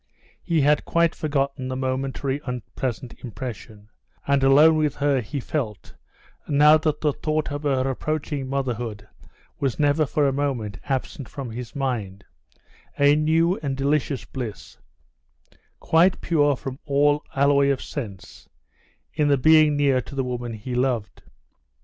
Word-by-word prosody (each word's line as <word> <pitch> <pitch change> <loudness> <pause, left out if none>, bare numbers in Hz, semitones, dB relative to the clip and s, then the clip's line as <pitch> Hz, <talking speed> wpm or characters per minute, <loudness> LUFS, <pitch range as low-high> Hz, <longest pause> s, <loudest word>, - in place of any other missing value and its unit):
He 165 -3 +1
had 145 +1 +3
quite 170 -1 +2
forgotten 140 -3 -2
the 130 - -3
momentary 135 +1 -2
unpleasant 125 0 -4
impression, 110 -3 -8 0.4
and 140 -1 +2
alone 145 +4 +6
with 150 -2 0
her 140 -2 +1
he 120 +6 -5
felt, 120 -7 -4 0.5
now 150 +1 +6
that 155 -1 -1
the 150 -2 +1
thought 155 +1 -2
of 145 0 -4
her 135 -3 0
approaching 145 0 -3
motherhood 120 -6 -3 0.5
was 135 -3 -1
never 145 0 +2
for 145 +1 +1
a 135 - 0
moment 125 -8 -2
absent 135 +2 -3
from 135 -5 -6
his 120 +1 -7
mind, 110 -8 -3 0.7
a 145 +1 +5
new 165 +4 +2
and 135 -3 -3
delicious 140 -4 0
bliss, 120 -3 -7 1.0
quite 170 +3 +3
pure 145 -4 +2
from 130 +1 -7
all 145 +1 +2
alloy 140 0 +4
of 135 -2 +1
sense, 105 -10 -8 0.6
in 150 -1 +1
the 140 -1 +4
being 155 +2 +5
near 140 -3 +3
to 140 - -11
the 135 - 0
woman 120 -2 -4
he 110 +4 -6
loved. 125 -5 -1
140 Hz, 145 wpm, -24 LUFS, 125-150 Hz, 1.0 s, alone